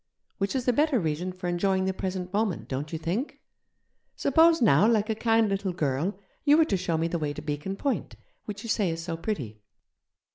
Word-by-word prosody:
Which 195 +5 -1
is 255 - -1
the 250 - +3
better 290 -1 +3
reason 165 +1 -2
for 185 0 -6
enjoying 190 +2 +1
the 190 - 0
present 185 0 -4
moment, 210 -2 -1
don't 140 +3 -4
you 165 - -2
think? 180 - -3 0.8
Suppose, 325 +4 +4
now, 210 - +5
like 220 -1 +2
a - - +2
kind 225 0 +3
little 195 -2 -1
girl, 160 +3 -1 0.3
you 295 +1 +5
were 320 - +5
to 255 - 0
show 180 -3 -1
me 165 +1 0
the 170 0 -2
way 150 -2 -2
to - - -7
Beacon 150 +6 -3
Point, 275 +6 -2 0.3
which 205 +1 -6
you 230 - -6
say 205 -4 +1
is 165 0 -4
so 170 -1 -3
pretty?' 140 - -4
190 Hz, 210 wpm, -27 LUFS, 165-225 Hz, 0.8 s, now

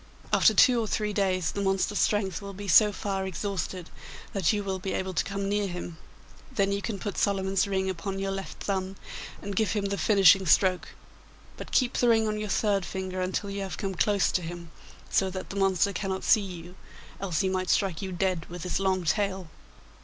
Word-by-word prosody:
After - - +5
two 250 -3 +6
or 220 - -2
three 210 0 -1
days 185 -4 +1
the 200 - -3
monster's 195 +1 0
strength 200 -3 +1
will 200 -1 -8
be 200 +1 -7
so 210 +4 +6
far 195 -1 -3
exhausted 185 -2 -4 0.4
that 190 -5 +2
you 210 -2 -1
will 190 -1 -3
be 190 +1 -3
able 190 0 -2
to - - +1
come 200 0 -3
near 205 0 0
him. 175 -2 -6 0.5
Then 195 0 +1
you 200 0 -1
can 215 -2 -3
put 205 0 -4
Solomon's 195 -1 +1
ring 190 -1 0
upon 190 +1 -3
your 195 0 -2
left 195 0 -6
thumb 190 -1 -2 0.5
and 200 0 -4
give 215 -2 +1
him 205 -2 -1
the 200 0 -2
finishing 195 -2 +5
stroke, 185 +2 +3 0.7
but - - -9
keep 255 -1 +2
the 245 - +4
ring 225 -1 +4
on 215 0 -2
your 210 -1 -4
third 200 0 +1
finger 185 0 -4
until 190 +2 -2
you 200 0 -4
have 195 -2 -5
come 195 -1 -3
close 200 +2 +2
to 185 - 0
him, 170 -1 -8 0.4
so 190 - +2
that 185 0 -6
the - - -7
monster 195 0 +2
cannot 190 0 -3
see 220 - +5
you, 180 -3 -8 0.5
else 185 -5 -1
he 190 - +1
might 185 -1 -1
strike 190 -5 +1
you 190 -1 -4
dead 180 -2 -1
with 175 -1 -7
his 180 - -1
long 190 -1 +1
tail. 190 +1 -1
195 Hz, 210 wpm, -27 LUFS, 185-200 Hz, 0.7 s, two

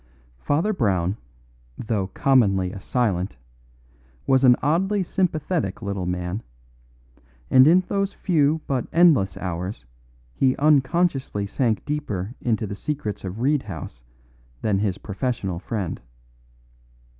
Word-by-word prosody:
Father 160 - 0
Brown, 95 - 0 0.6
though 105 -4 -2
commonly 100 -6 +2
a 100 - -7
silent, 100 - -1 0.9
was 135 0 +3
an 125 -2 +7
oddly 190 +7 +1
sympathetic 165 - -1
little 100 -3 -3
man, 90 +3 -3 1.1
and 130 +1 +7
in 175 +4 +6
those 195 +1 -1
few 160 -5 +1
but 130 -4 -1
endless 160 - +4
hours 90 - -5 0.5
he 130 - +2
unconsciously 145 - +2
sank 110 +2 -1
deeper 115 -9 -3
into 110 -2 0
the 100 - -5
secrets 105 -3 -4
of 95 +4 -5
Reed 145 +2 +2
House 80 - -8 0.6
than 100 -3 +1
his 100 -2 -1
professional 100 -3 -3
friend. 100 -3 -4
115 Hz, 115 wpm, -23 LUFS, 95-150 Hz, 1.1 s, an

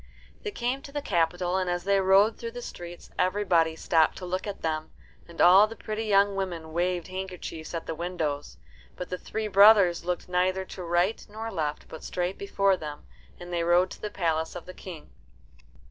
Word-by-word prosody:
They 425 - -3
came 260 -7 -2
to 280 - -11
the 290 0 -4
capital, 175 +1 +1
and 185 -1 0
as 175 0 -1
they 200 +1 +3
rode 195 +3 +5
through 230 -1 -7
the 245 - -6
streets 175 -4 -9
everybody 180 -4 +2
stopped 160 -1 +2
to 185 - -6
look 185 +3 -3
at 200 - -6
them, 155 -1 -2 0.4
and 170 - -14
all 190 +4 +8
the 225 - -9
pretty 220 0 -4
young 200 -1 +3
women 170 -5 -4
waved 175 +1 -1
handkerchiefs 180 -4 -6
at 165 - -4
the - - -3
windows. 160 -4 -3 0.4
But 180 - -6
the 180 - -3
three 220 -1 -4
brothers 200 -3 +6
looked 180 0 -3
neither 185 +1 +1
to 185 - -9
right 175 +5 +1
nor 220 +2 -6
left 155 -5 -3
but 160 - -10
straight 180 +1 -3
before 195 -1 +2
them, 150 -2 -8 0.3
and 175 0 -8
they 170 -1 0
rode 175 +2 +3
to - - -10
the 210 - -3
palace 160 -4 -1
of 175 - -7
the 185 - -9
King. 175 -4 -10
180 Hz, 195 wpm, -27 LUFS, 170-200 Hz, 0.4 s, all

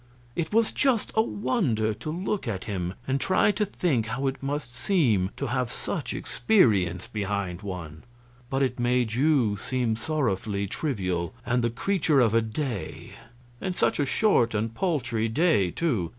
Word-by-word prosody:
It 165 -2 -2
was 225 +1 +3
just 260 -6 +1
a 220 - +4
wonder 155 - 0
to 115 +8 -7
look 185 +1 -2
at 95 -5 -2
him 95 -4 -3
and 135 +1 0
try 190 +2 +3
to 210 +1 0
think 135 - 0
how 125 +5 -2
it 135 0 -2
must 135 -3 -4
seem 120 - +2
to - - -2
have - - -1
such - - -4
experience 100 - +2
behind 100 -3 -3
one. 90 -6 -7 0.5
But 135 +1 +1
it 125 -1 -1
made 120 -2 +1
you 130 -5 +3
seem 120 +1 -1
sorrowfully 110 -7 -1
trivial, 95 - -2
and 120 0 +1
the 120 - +2
creature 155 - +1
of 115 -4 +4
a 115 - +4
day, 115 0 -4 0.5
and 185 -2 -2
such - - +1
a 145 - +1
short 125 - +3
and 110 +2 -1
paltry 120 - 0
day, 140 - +3
too. 110 - -1
120 Hz, 165 wpm, -26 LUFS, 105-155 Hz, 0.5 s, a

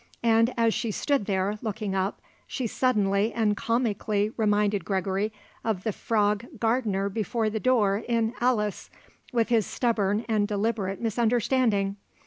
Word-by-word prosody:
And 230 +1 +4
as 230 -1 +3
she 230 - -2
stood 270 +1 0
there, 200 +1 0
looking 215 -3 -3
up, 190 +1 -1 0.3
she 255 - -3
suddenly 210 -3 +1
and 215 -3 +1
comically 215 -2 0
reminded 210 -3 +1
Gregory 195 +3 -1 0.3
of 215 -5 -1
the 220 - 0
Frog 210 +1 0
gardener 225 -4 +1
before 220 +2 -1
the 220 - -2
door 215 -4 +2
in 230 -1 +1
"Alice," 215 -5 0 0.4
with 235 -2 +1
his 225 -4 +2
stubborn 220 -2 0
and 215 -3 +1
deliberate 205 -2 -1
misunderstanding. 225 -3 +1
215 Hz, 135 wpm, -26 LUFS, 200-230 Hz, 0.4 s, And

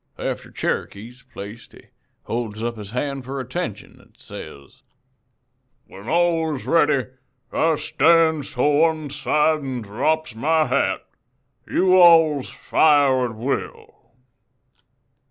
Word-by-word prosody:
After - - -5
Cherokee's 120 +5 -4
placed 120 -2 -11
he - - -16 0.4
holds 115 -2 -4
up 120 0 -2
his 105 -3 -9
hand 135 +3 -3
for 135 +2 -5
attention 125 - -6
an' - - -25
says: 70 -1 -12 1.0
"'When 100 +5 -11
all 165 -2 +1
is 130 - -8
ready 145 -6 +2 0.4
I 160 0 +2
stands 160 -3 +2
to 125 - 0
one 155 0 +2
side 155 +2 +1
an' 130 -4 -5
drops 155 +10 -1
my 155 +7 +1
hat. 135 +1 0 0.6
You 185 0 +3
alls 165 -5 +5
fires 140 -5 +2
at 110 - -10
will.' 125 0 -5
140 Hz, 120 wpm, -22 LUFS, 120-160 Hz, 1.0 s, alls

